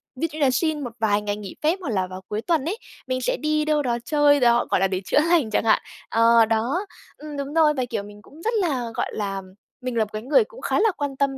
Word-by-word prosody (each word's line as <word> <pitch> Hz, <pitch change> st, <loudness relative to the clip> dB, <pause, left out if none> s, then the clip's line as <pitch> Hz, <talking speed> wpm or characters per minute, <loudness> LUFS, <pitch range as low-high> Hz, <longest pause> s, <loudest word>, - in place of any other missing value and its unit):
Ví 325 Hz, +6 st, -1 dB
dụ 305 Hz, -, -8 dB
như 305 Hz, -, 0 dB
là 270 Hz, -, +5 dB
xin 315 Hz, +1 st, 0 dB
một 240 Hz, -3 st, -6 dB
vài 210 Hz, -2 st, +2 dB
ngày 205 Hz, 0 st, -2 dB
nghỉ 205 Hz, -2 st, -8 dB
phép 325 Hz, +5 st, +2 dB
hoặc 340 Hz, -, -4 dB
là 190 Hz, -4 st, 0 dB
vào 185 Hz, 0 st, -8 dB
cuối 210 Hz, +1 st, -3 dB
tuần 310 Hz, +2 st, 0 dB
ấy, 370 Hz, +7 st, -2 dB, 0.3 s
mình 255 Hz, 0 st, -1 dB
sẽ -, -, 0 dB
đi 305 Hz, 0 st, 0 dB
đâu 305 Hz, -1 st, +2 dB
đó 240 Hz, -4 st, 0 dB
chơi 290 Hz, -1 st, +4 dB
đó, 240 Hz, -2 st, +4 dB
gọi -, -, +3 dB
là 195 Hz, -, +3 dB
để 185 Hz, -1 st, -2 dB
chữa 185 Hz, -, +3 dB
lành 325 Hz, -10 st, +3 dB
chẳng 210 Hz, -, +1 dB
hạn. 220 Hz, -1 st, +4 dB, 0.3 s
Ờ, 230 Hz, 0 st, +5 dB
đó, 230 Hz, -, 0 dB, 0.3 s
ừm, 300 Hz, -1 st, -8 dB
đúng 280 Hz, +1 st, -4 dB
rồi, 315 Hz, -2 st, +4 dB
và, 260 Hz, -3 st, -1 dB
kiểu, 200 Hz, -, -2 dB
mình 205 Hz, 0 st, -12 dB
cũng 300 Hz, +8 st, -16 dB
rất 455 Hz, +7 st, -1 dB
là, 280 Hz, -, 0 dB
gọi -, -, -1 dB
là, 195 Hz, -2 st, -3 dB, 0.4 s
mình 250 Hz, -1 st, -4 dB
là 225 Hz, -, +4 dB
một 210 Hz, -, -7 dB
cái 215 Hz, -, -4 dB
người 300 Hz, -, +4 dB
cũng 485 Hz, +2 st, -14 dB
khá -, -, 0 dB
là 440 Hz, +1 st, +4 dB
quan 285 Hz, -2 st, -3 dB
tâm 275 Hz, -1 st, 0 dB
260 Hz, 280 wpm, -23 LUFS, 220-305 Hz, 0.4 s, là